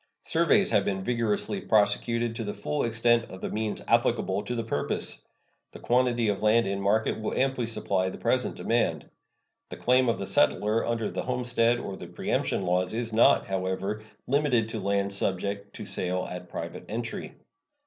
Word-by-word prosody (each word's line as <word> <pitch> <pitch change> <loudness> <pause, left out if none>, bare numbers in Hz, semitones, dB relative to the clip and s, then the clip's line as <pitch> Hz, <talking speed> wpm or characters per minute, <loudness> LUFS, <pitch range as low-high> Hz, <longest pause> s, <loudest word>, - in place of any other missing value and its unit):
Surveys 170 +5 +3
have 105 -3 +4
been 95 -1 -2
vigorously 115 - 0
prosecuted 115 - +1
to 115 - -3
the 105 -1 -4
full 145 +8 -2
extent 115 0 +2
of 95 - -9
the - - -4
means 110 -1 -2
applicable 95 +2 +2
to 120 +4 -4
the 115 - -2
purpose. 75 -10 -2 0.5
The - - -10
quantity 120 -2 +2
of 100 -1 0
land 110 +2 +4
in 100 0 -2
market 110 +3 +1
will 110 - -3
amply 130 -3 +1
supply 95 -4 0
the - - -8
present - - 0
demand. - - 0 0.6
The - - -7
claim 125 0 +3
of 115 - +1
the - - -4
settler 105 +9 +2
under 115 -2 -1
the - - -3
homestead 120 -2 +1
or 100 - -5
the - - -8
preemption - - -1
laws 90 +2 0
is 115 -1 -3
not, 115 - +5
however, 95 +2 -2 0.2
limited 125 -5 +2
to - - -4
lands 100 0 0
subject 100 +1 -2
to - - -7
sale 90 -2 -1
at 90 0 -8
private - - -6
entry. 115 +2 -5
110 Hz, 175 wpm, -27 LUFS, 100-120 Hz, 0.6 s, not